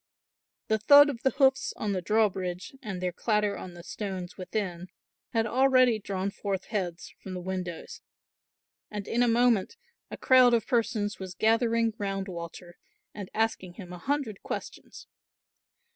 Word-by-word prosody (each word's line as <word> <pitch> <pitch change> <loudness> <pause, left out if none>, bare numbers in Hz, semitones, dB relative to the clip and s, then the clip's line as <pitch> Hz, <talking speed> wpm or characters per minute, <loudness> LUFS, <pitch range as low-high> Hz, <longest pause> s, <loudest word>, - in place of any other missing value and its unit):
The 220 0 +1
thud 290 +6 +8
of 240 -4 -9
the 265 - +3
hoofs 270 -1 +2
on 210 - -2
the 185 -2 -1
drawbridge 185 -2 0
and 195 -7 -5
their 180 0 -1
clatter 210 +2 0
on 180 -1 -8
the 175 - -11
stones 190 -3 -5
within, 185 -2 -4 0.4
had 225 -1 +1
already 255 -1 +4
drawn 195 0 -3
forth 195 -2 -3
heads 180 -5 -4
from 190 -1 -7
the - - -4
windows 180 -2 -5 0.9
and 205 -2 -6
in 240 - 0
a 245 - +4
moment 235 - +2 0.3
a - - -7
crowd 255 -2 +6
of 225 - 0
persons 220 -4 0
was 185 -2 -7
gathering 230 0 +2
round 195 -1 -2
Walter 175 0 -8 0.3
and 200 -3 -7
asking 220 -5 -1
him 180 -4 -9
a 180 - -8
hundred 265 -3 -2
questions. - - -7
210 Hz, 155 wpm, -28 LUFS, 185-230 Hz, 0.9 s, thud